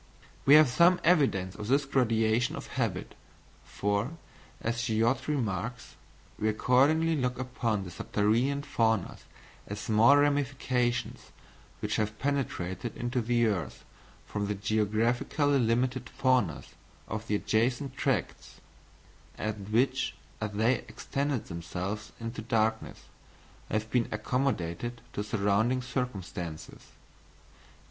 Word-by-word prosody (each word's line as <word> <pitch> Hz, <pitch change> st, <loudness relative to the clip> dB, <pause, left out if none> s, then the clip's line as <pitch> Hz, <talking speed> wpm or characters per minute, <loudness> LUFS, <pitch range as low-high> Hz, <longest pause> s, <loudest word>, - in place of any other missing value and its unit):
We 140 Hz, -, +9 dB
have 155 Hz, -1 st, +8 dB
some 170 Hz, +8 st, +4 dB
evidence 135 Hz, -, +3 dB
of 105 Hz, 0 st, -7 dB
this 140 Hz, +3 st, +3 dB
gradation 115 Hz, -3 st, +2 dB
of -, -, -6 dB
habit; -, -, -2 dB, 0.5 s
for, 105 Hz, +10 st, -2 dB, 0.4 s
as 115 Hz, +1 st, -2 dB
Schiödte 115 Hz, +2 st, +1 dB
remarks: 125 Hz, -4 st, -3 dB, 0.4 s
"We 110 Hz, -, +1 dB
accordingly 145 Hz, +9 st, +3 dB
look 125 Hz, -3 st, -1 dB
upon 120 Hz, -5 st, -1 dB
the 90 Hz, -, -8 dB
subterranean 115 Hz, +10 st, 0 dB
faunas 110 Hz, -7 st, 0 dB, 0.4 s
as 100 Hz, +1 st, -5 dB
small 110 Hz, +6 st, +5 dB
ramifications 135 Hz, -4 st, 0 dB, 0.5 s
which -, -, -1 dB
have 110 Hz, 0 st, -1 dB
penetrated 120 Hz, -7 st, -2 dB
into 120 Hz, +1 st, -1 dB
the 120 Hz, +1 st, +2 dB
earth 100 Hz, -7 st, -2 dB, 0.4 s
from 105 Hz, -1 st, -3 dB
the 105 Hz, -, -1 dB
geographically 110 Hz, +7 st, +1 dB
limited 125 Hz, +2 st, 0 dB
faunas 130 Hz, -, +1 dB, 0.4 s
of 110 Hz, +2 st, -5 dB
the 105 Hz, -, +1 dB
adjacent 125 Hz, +6 st, 0 dB
tracts, -, -, -2 dB, 0.8 s
and 105 Hz, -2 st, -4 dB
which, 125 Hz, +4 st, +1 dB, 0.3 s
as 105 Hz, -1 st, -3 dB
they 115 Hz, +4 st, +2 dB
extended 140 Hz, -3 st, -2 dB
themselves 90 Hz, +5 st, -5 dB
into 115 Hz, -1 st, -5 dB
darkness, 110 Hz, -1 st, -1 dB, 0.7 s
have 110 Hz, +1 st, -2 dB
been 120 Hz, -2 st, +1 dB
accommodated 120 Hz, -2 st, -2 dB
to 105 Hz, -, -2 dB
surrounding 110 Hz, +4 st, +1 dB
circumstances. 95 Hz, -, -5 dB
115 Hz, 110 wpm, -29 LUFS, 105-130 Hz, 0.8 s, We